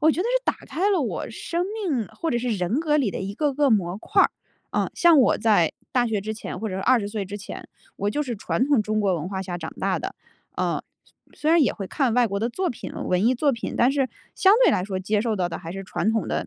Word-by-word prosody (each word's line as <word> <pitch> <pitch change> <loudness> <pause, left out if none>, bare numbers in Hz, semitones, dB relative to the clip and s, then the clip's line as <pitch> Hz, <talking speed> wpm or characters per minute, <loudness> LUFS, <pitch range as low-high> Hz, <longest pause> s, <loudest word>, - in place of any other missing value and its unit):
我 315 +1 +5
觉 340 - -1
得 - - 0
是 - - +1
打 - - +1
开 390 +5 0
了 380 -4 +2
我 255 - -3
生 345 +1 -2
命， 330 - -1
或 330 - -4
者 240 - +1
是 245 +1 -2
人 205 - 0
格 300 -2 +2
里 255 -9 +1
的 - - -5
一 195 +1 -4
个 295 +1 0
个 285 -1 +3
模 185 -4 +1
块 - - +3
儿， - - +3 0.4
嗯， - - 0
像 340 -3 +6
我 255 - +4
在 210 -8 +3 0.2
大 245 -1 +3
学 215 -3 -1
之 215 +2 -4
前 225 - -6
或 220 - -2
者 185 - -4
是 - - -3
20 235 -4 +3
岁 205 -1 -3
之 200 +2 -6
前， 200 - -8 0.3
我 205 +1 -1
就 295 - -1
是 245 -5 -4
传 250 +5 0
统 280 -7 +3
中 215 +1 0
国 195 -3 +2
文 170 +1 -3
化 190 -1 -3
下 180 -2 -4
长 160 -2 -6
大 - - +1
的， - - -5 0.4
呃， - - -1 0.5
虽 - - -19
虽 305 - +2
然 330 -2 +6
也 - - +2
会 195 - -6
看 255 +2 0
外 245 -1 +4
国 200 -1 -2
的 230 +3 0
作 370 +8 -1
品 240 - -6
文 185 +4 0
艺 255 - +4
作 285 +4 +2
品， 230 - -4
但 245 +3 +4
是 270 -2 +1 0.3
相 385 - +5
对 - - +6
来 180 - +1
说， 190 -2 -3
接 205 +2 0
受 225 -1 0
到 180 -2 0
的 - - -5
还 165 -1 -7
是 195 +1 -6
传 200 +3 0
统 225 -1 -1
的 - - -2
225 Hz, 295 characters per minute, -24 LUFS, 195-290 Hz, 0.5 s, 像